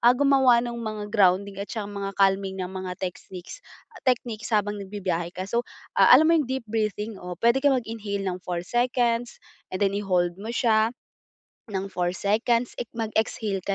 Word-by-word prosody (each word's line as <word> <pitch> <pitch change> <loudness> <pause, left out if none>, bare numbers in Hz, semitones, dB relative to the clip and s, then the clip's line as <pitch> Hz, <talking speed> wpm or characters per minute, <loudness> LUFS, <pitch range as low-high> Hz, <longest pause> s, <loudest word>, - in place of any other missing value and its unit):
ah, 240 +1 +5
gumawa 265 -3 +4
nung 235 -1 -5
mga 215 -2 -4
grounding 195 -1 +3
at 200 - -5
saka 220 -3 -4
mga 200 -1 -4
calming 195 -1 +2
na 185 - -3
mga 185 -1 -5
techsniques 185 - -7 0.5
techniques 230 -3 -1
habang 210 -2 0
nagbibiyahe 185 -4 -3
ka. 185 - -3
So 235 +5 -2 0.2
ah, - - +5
alam 315 - +5
mo 330 - +5
'yong 275 - -3
deep 260 -2 -2
breathing 215 -1 -2
o 180 0 -6
puwede 235 +7 +3
kang 280 -1 +4
mag-inhale 215 -4 -4
ng 185 -1 -3
4 175 -1 -4
seconds 240 +1 0 0.3
and 185 +2 -1
then 195 - +1
i-hold 185 -4 +1
mo 215 - -6
siya, 225 -2 +3 0.8
ng 195 -3 -4
4 180 -1 -1
seconds. 230 +5 0 0.2
Mag-exhale 220 -2 -1
ka 200 - +1
210 Hz, 175 wpm, -25 LUFS, 190-235 Hz, 0.8 s, ah